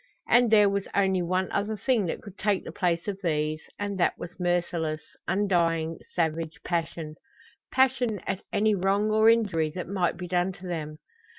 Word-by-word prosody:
And 240 -1 +5
there 210 -2 +6
was 200 0 -1
only 190 -2 +2
one 185 +2 0
other 210 +2 -1
thing 230 -5 +1
that - - -4
could 200 -3 -11
take 205 -2 0
the - - -6
place 175 -2 0
of 200 -1 -3
these, 155 -3 0 0.2
and 200 -1 -3
that 175 - +2
was 175 +2 -9
merciless, 170 -3 0 0.3
undying, 170 -4 +1 0.2
savage 165 -1 -1
passion 165 -2 -3 0.5
passion 250 -5 +2
at 190 - -2
any 215 +1 +3
wrong 200 +2 +1
or 220 +1 +5
injury 190 -9 +2
that 180 - -4
might 180 -2 0
be 180 0 -6
done 180 +1 0
to 185 - -12
them. 155 -4 -4
185 Hz, 175 wpm, -27 LUFS, 165-205 Hz, 0.5 s, there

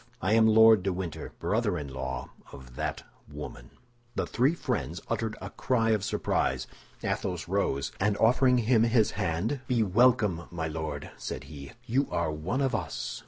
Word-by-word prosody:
I 95 +4 +1
am 110 0 +6
Lord 110 -1 +7
de 95 +1 0
Winter, 90 -3 -5
brother 105 -4 0
in 75 -2 -5
law 65 -1 -5 0.2
of 65 -2 -12
that - - -3 0.3
woman." 70 -5 -8 0.5
The - - 0
three 135 +7 +2
friends 85 - -3
uttered 110 -2 -2
a - - -7
cry 115 -3 +1
of 105 -3 +1
surprise. - - 0 0.4
Athos 90 -4 -2
rose, 85 -8 0
and 105 +1 +1
offering 125 +3 +4
him 115 -1 +3
his 115 -1 +3
hand, 90 - -1
"Be 120 -3 +2
welcome, 105 -4 +3
my 80 -2 -3
Lord," 80 0 -5
said - - -5
he, 70 -3 -10
"you 135 +4 +1
are 85 -2 -1
one 85 - -2
of 135 -2 +1
us." - - -3
100 Hz, 165 wpm, -28 LUFS, 80-115 Hz, 0.5 s, Lord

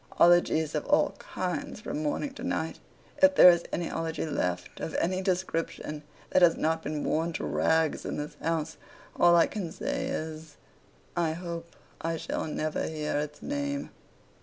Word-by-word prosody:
Ologies 170 -3 +5
of - - -1
all - - +4
kinds - - -4
from 150 - -4
morning 210 - -2
to - - -9
night. - - -2 0.4
If 285 0 +7
there 180 - +10
is 170 0 0
any 170 -1 -1
Ology 165 0 -3
left, 90 - -2
of 160 - -4
any 185 +2 0
description, 175 -5 -2 0.3
that 185 - +4
has 170 -2 +6
not 160 +1 +1
been 150 -1 -3
worn 165 +2 0
to - - -3
rags 160 -1 +1
in - - -4
this 150 0 -4
house, 160 -1 -1 0.4
all 175 0 +6
I 170 - +6
can 190 -6 -4
say - - -3
is, 155 -1 -5 0.6
I 165 -2 +1
hope 170 0 -6 0.3
I 165 0 -1
shall - - -3
never 155 0 -2
hear 150 -2 -2
its 150 0 -5
name. 285 0 -3
165 Hz, 165 wpm, -29 LUFS, 155-175 Hz, 0.6 s, there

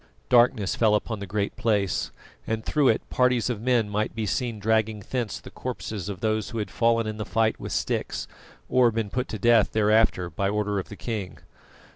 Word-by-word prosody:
Darkness 120 -5 +4
fell 110 -2 +3
upon 110 0 -2
the 100 - -6
Great 100 +1 -2
Place, 105 -6 0 0.4
and 110 0 -2
through 150 -3 +2
it 115 - +2
parties 125 -2 +2
of 110 -3 -4
men 120 -3 +2
might 105 +2 -2
be 110 -1 -2
seen 120 +2 -1
dragging 110 0 0
thence 120 -5 -2
the - - -12
corpses 105 -3 -5
of 95 -3 -6
those 110 -1 0
who 115 - -6
had 105 - -3
fallen 115 -1 +2
in 110 0 -4
the 105 - -3
fight 110 0 0
with - - -6
sticks, - - -2 0.4
or 125 -2 +4
been 110 -2 -2
put 125 0 -2
to 110 - -5
death 115 0 +4
thereafter 110 -4 +3
by 100 +5 -1
order 105 -1 0
of 95 - -6
the 105 - -8
king. 105 -4 -5
110 Hz, 200 wpm, -26 LUFS, 105-115 Hz, 0.4 s, Darkness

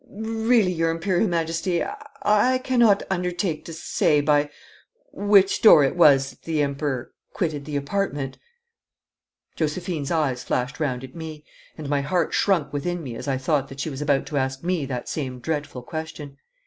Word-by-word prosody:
'Really, 220 -1 +1
your 165 -1 +1
Imperial 175 +5 +1
Majesty, 170 +1 0 0.4
I 210 +5 +4
cannot 235 -6 +4
undertake 180 -2 -1
to - - -7
say 155 -1 +1
by 145 0 +2 0.6
which 200 -1 +3
door 165 -9 +8
it 135 - +1
was 140 -5 +5
that - - -22
the 155 -2 0
Emperor 140 -2 -3 0.2
quitted 155 -6 -2
the 150 - -5
apartment.' 145 -2 -2 1.2
Josephine's 160 -1 -2
eyes 145 -7 0
flashed 125 +2 -2
round 130 -5 -1
at 130 0 -10
me, 160 -2 -8 0.3
and 155 -3 -6
my 140 0 +1
heart 165 +4 0
shrunk 165 -8 +1
within 175 +4 -2
me 125 -5 -6
as - - -7
I 135 -1 0
thought 140 +1 0
that 135 - -11
she 150 - -2
was 135 +1 -6
about 145 -2 +1
to 150 - -4
ask 135 0 -2
me 175 -5 -1
that 125 -2 -4
same 130 -5 -4
dreadful 145 -2 -4
question. 150 -1 -7
155 Hz, 165 wpm, -24 LUFS, 140-175 Hz, 1.2 s, door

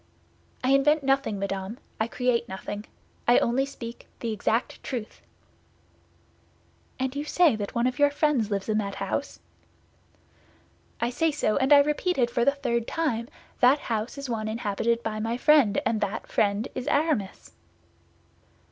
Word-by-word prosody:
"I 255 - +2
invent 290 +2 +4
nothing, 270 -5 +1
madame; 195 +2 -4 0.2
I 220 - +1
create 240 -1 0
nothing. 205 +2 -6 0.4
I 240 - +6
only 265 +3 +2
speak 235 -4 -9
that 235 - -5
exact 225 +2 -1
truth." 235 -5 -6 1.8
"And 260 +1 -2
you 290 - -2
say 310 -3 +3
that 205 -2 -5
one 235 +1 +2
of 255 +1 -1
your 290 0 +6
friends 285 -7 +1
lives 200 -2 -2
in 215 -1 +1
that 200 -2 -3
house?" - - -3 1.6
"I 235 +1 0
say 325 +6 +1
so, 290 -8 0
and 270 0 +1
I 285 -1 +9
repeat 300 +5 0
it 240 -2 +2
for 240 - +1
the 275 - +5
third 235 -5 -2
time; 240 -8 -1 0.3
that 255 +4 +6
house 225 -2 -3
is 280 -1 -5
one 220 -3 -2
inhabited 230 +1 -1
by 215 -1 -3
my 225 +2 -1
friend, 285 -4 +4
and 220 -2 0
that 205 0 -2
friend 205 +1 0
is 255 - -5
Aramis." 285 -11 -1
235 Hz, 155 wpm, -26 LUFS, 215-280 Hz, 1.8 s, I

